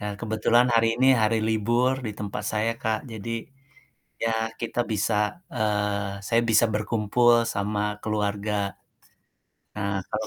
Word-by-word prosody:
eee, 105 -1 -3
kebetulan 115 +2 +3
hari 115 0 +4
ini 130 - +5 0.2
hari 110 +1 +3
libur 120 +4 +2
di 105 - -3
tempat 105 0 -4
saya 110 +1 +1
Kak, 110 0 +1
jadi 110 +1 -6 0.9
ya 115 - +2 0.3
kita 120 +1 -3
bisa 105 +1 0 0.4
eee, 105 -3 -1
saya 115 0 +3
bisa 110 +1 +5
berkumpul 110 +3 +2 0.2
sama 105 +1 -1 0.2
keluarga. 105 -1 -1 1.2
Eee, 100 -2 -1
kalau 110 0 -3
110 Hz, 130 wpm, -25 LUFS, 105-115 Hz, 1.2 s, ini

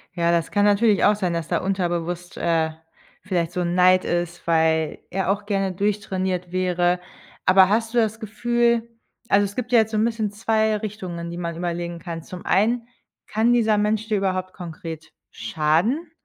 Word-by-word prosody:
Ja, 170 -1 +1
das 170 -1 0
kann 205 - +2
natürlich 205 +1 +3
auch 210 - +5
sein, 185 -4 -1
dass 165 -2 -3
da - - +1
unterbewusst, 175 -2 -2
äh, 165 -2 +1 0.5
vielleicht 175 -4 -1
so 180 0 -2
'n 175 0 -1
Neid 185 0 +5
ist, 175 0 -2
weil 160 -1 +1
er 190 0 0
auch 205 0 -2
gerne 195 -2 0
durchtrainiert 190 -3 -2
wäre. 180 -1 +1 0.5
Aber 185 0 +6
hast 225 +2 0
du - - 0
das 220 -1 +1
Gefühl 235 +1 0 0.4
also 200 +1 +4
es 200 - -7
gibt 250 0 -4
ja 235 - +6
jetzt 220 0 +1
so 215 - -1
'n 215 - +3
bisschen 220 -3 -1
zwei 220 0 +1
Richtungen, 185 -5 -6
die 170 - -6
man 170 -1 -4
überlegen 170 0 -3
kann. 170 -1 -6
Zum 180 -1 -10
einen, 230 +4 +2 0.4
kann 225 +3 +2
dieser 220 -3 +3
Mensch 215 +1 0
dir 215 -2 +1
überhaupt 185 -1 -2
konkret 165 -2 -8 0.2
schaden? 165 - 0
190 Hz, 180 wpm, -23 LUFS, 175-215 Hz, 0.5 s, Aber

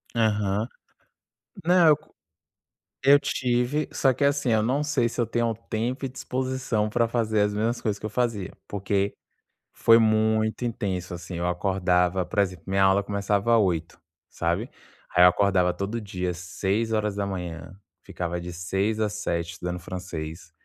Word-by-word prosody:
Aham. 105 -1 +1 1.0
Não, 175 -1 +5
eu 150 - +6
co 155 - -26 0.9
eu 140 +1 +8
tive, 125 +3 0
só 135 -1 +3
que 140 - -2
assim, 140 -3 +2
eu 110 -1 +3
não 130 +6 +1
sei 145 -5 +1
se 120 - -8
eu 120 - +3
tenho 115 0 0 0.2
tempo 120 +5 -2
e - - -3
disposição 130 -4 -2
pra 115 +2 +2
fazer 110 -2 +1
as 105 0 +1
mesmas 115 +3 -1
coisas 105 -2 -1
que - - -7
eu - - -2
fazia, 110 -4 -1 0.2
porque 100 0 -1 0.6
foi 115 0 +6
muito 110 +1 +2
intenso, 95 -6 -3
assim, 90 +1 -7
eu 85 +1 -1
acordava 90 0 +1
por 110 - -7
exemplo: 90 -4 -1
minha 95 0 +1
aula 95 +1 +4
começava 100 +3 +1
8h, 85 -6 0 0.3
sabe, - - -1 0.5
aí 90 - +7
eu - - +10
acordava 90 -1 +2
todo 100 +5 -3
dia 90 -4 -3
6h, 100 -1 -2 0.2
ficava 85 0 -4
de 90 0 -7
6h 95 +5 -1
às 105 -1 0
7h 85 -5 -2
estudando 90 +1 -4
francês, 85 -2 -7
105 Hz, 155 wpm, -25 LUFS, 90-115 Hz, 1.0 s, eu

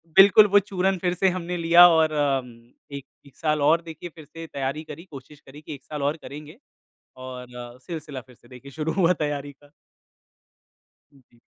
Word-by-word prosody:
बिल्कुल 200 +2 +8
वो 205 0 +5
चूरन 190 -1 -1
फिर 180 0 -1
से 190 +2 +2
हमने 180 -1 -4
लिया 170 +1 +7
और 160 -1 +3
अ, 145 -3 +1
उम, 120 -1 -15 0.2
1 140 -1 -7 0.3
साल 150 -2 0
और 160 +4 +4
देखिए 165 +1 -9
फिर 155 - -12
से 165 +2 -10
तैयारी 140 +2 -4
करी 160 +3 -11
कोशिश 140 +2 -12
करी 145 +2 -15
कि 155 - -8
1 140 - -11
साल 150 -2 -6
और 145 +3 0
करेंगे 150 +6 -10 0.6
और 125 -1 -9
अ, 120 0 -9
सिलसिला 155 -6 -6
फिर 125 +1 -20
से 120 - -23
देखिए 130 +3 -13
शुरू 155 +3 -3
हुआ 180 -2 +3
तैयारी 145 -1 -3
का। 145 +1 -24 1.4
हुँ 140 - -22
जी। 120 - -25
150 Hz, 190 wpm, -24 LUFS, 135-170 Hz, 1.4 s, बिल्कुल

